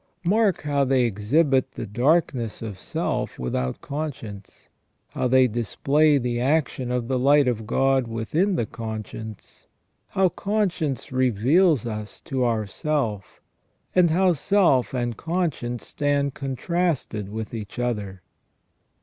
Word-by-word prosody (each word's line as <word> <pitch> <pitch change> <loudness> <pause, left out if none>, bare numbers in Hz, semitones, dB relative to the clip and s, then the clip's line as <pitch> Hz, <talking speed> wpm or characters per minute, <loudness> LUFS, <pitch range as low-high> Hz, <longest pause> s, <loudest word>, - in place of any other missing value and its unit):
Mark 200 0 +2
how 145 -1 +1
they 130 -1 +3
exhibit 130 - +2
the - - -5
darkness 120 -1 +1
of 105 -4 -6
self - - -2
without 65 0 -2
conscience; 125 -9 -6 0.4
how - - -1
they 130 0 +5
display 140 +6 +2
the 120 -2 -1
action 130 -2 0
of 125 -2 -1
the 130 -1 0
light 140 +1 +5
of 110 -3 -1
God 135 0 +2
within 150 - 0
the 120 - 0
conscience; 110 -1 -8 0.4
how 190 -1 +2
conscience 175 - -1
reveals 130 - +3
us 105 -2 -5
to 130 -2 -2
ourself; 115 0 -2 0.5
and 180 -2 +5
how 180 +3 +3
self 160 -7 +2
and 120 -3 -2
conscience 160 -9 -2
stand 145 -2 0
contrasted 140 - -2
with 110 +1 -5
each 105 -3 -7
other. 105 -6 -3
130 Hz, 125 wpm, -24 LUFS, 115-155 Hz, 0.5 s, they